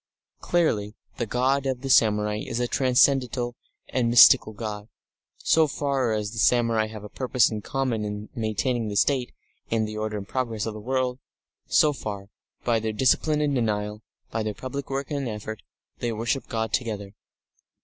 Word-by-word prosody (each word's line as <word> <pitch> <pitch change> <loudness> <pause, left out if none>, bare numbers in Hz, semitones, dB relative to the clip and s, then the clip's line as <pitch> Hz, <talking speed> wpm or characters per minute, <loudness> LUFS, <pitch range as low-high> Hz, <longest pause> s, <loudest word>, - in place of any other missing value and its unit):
Clearly 110 -12 0 0.2
the 120 - -2
God 135 +4 +1
of 130 -2 -2
the 135 - -3
samurai 105 -2 +3
is 115 +2 -4
a 120 - 0
transcendental 125 -2 +2 0.3
and 120 -2 0
mystical 115 -2 +7
God. 105 -1 -6 0.5
So 160 -1 +3
far 135 -4 0
as 105 -1 -2
the 110 - -6
samurai 115 -2 +3
have 110 -1 -9
a - - -7
purpose 125 +1 +1
in 110 -1 -4
common 125 -3 -1
in 105 0 -5
maintaining 115 +1 -1
the 105 - -4
State, 130 +3 +2 0.4
and 110 -1 +1
the 110 0 -6
order 110 0 -2
and 100 -1 -7
progress 115 -5 -2
of 110 - -3
the 110 - -8
world, 130 +2 -1 0.5
so 150 -1 +4
far, 100 -6 -6 0.4
by 115 -2 +2
their 110 0 -2
discipline 150 +6 +2
and 145 -1 +1
denial, 105 -3 -1 0.3
by 115 - -1
their 110 -1 -3
public 130 +4 -6
work 135 +2 -3
and 140 -3 -2
effort, 110 0 -6 0.4
they 120 - -1
worship 115 +4 -2
God 110 -2 -3
together. 105 -4 -2
115 Hz, 170 wpm, -25 LUFS, 105-130 Hz, 0.5 s, mystical